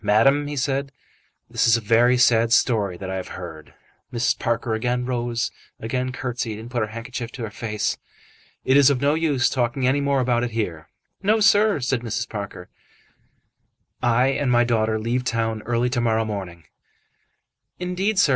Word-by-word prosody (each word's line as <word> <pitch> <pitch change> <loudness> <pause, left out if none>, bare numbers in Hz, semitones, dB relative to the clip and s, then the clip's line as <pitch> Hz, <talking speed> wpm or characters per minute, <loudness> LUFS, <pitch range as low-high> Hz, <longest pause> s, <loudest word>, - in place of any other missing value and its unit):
"Madam," 135 +8 +3
he 145 - -4
said, 135 +1 -1 0.6
"this - - +1
is 115 0 +5
a - - -5
very 115 +3 +4
sad 115 -2 +4
story 105 -7 +2
that 95 +1 -6
I 95 - -2
have 95 - -5
heard." 80 -4 -9 0.4
Mrs. 120 -1 0
Parker 115 0 -1
again 125 +2 -1
rose, 120 -2 -2 0.3
again 125 +3 -2
curtsied, 125 -4 -4
and 115 +3 -9
put 125 - -1
her 110 - 0
handkerchief 115 +2 -6
to 125 - -6
her 110 - -5
face. 105 -1 -2 0.7
"It 130 +1 +4
is 145 -1 +7
of 140 -3 +1
no 140 +2 +2
use 150 -6 +2
talking 125 +1 0
any 135 +3 +2
more 140 -1 +1
about 120 -2 +1
it 125 - -1
here." 85 -8 -3 0.3
"No, 215 +3 +3
sir," 205 -2 +4
said 125 0 0
Mrs. 115 -1 -3
Parker. 100 -4 -7 1.3
"I 120 +2 +3
and 135 -1 0
my 120 0 +4
daughter 110 -2 +1
leave 120 +3 -1
town 115 -3 -1
early 120 +1 +1
to 120 -2 0
morrow 115 -1 +1
morning." 95 -5 -6 1.1
"Indeed, 185 +4 -1
sir. 190 - +5
120 Hz, 175 wpm, -23 LUFS, 110-130 Hz, 1.3 s, is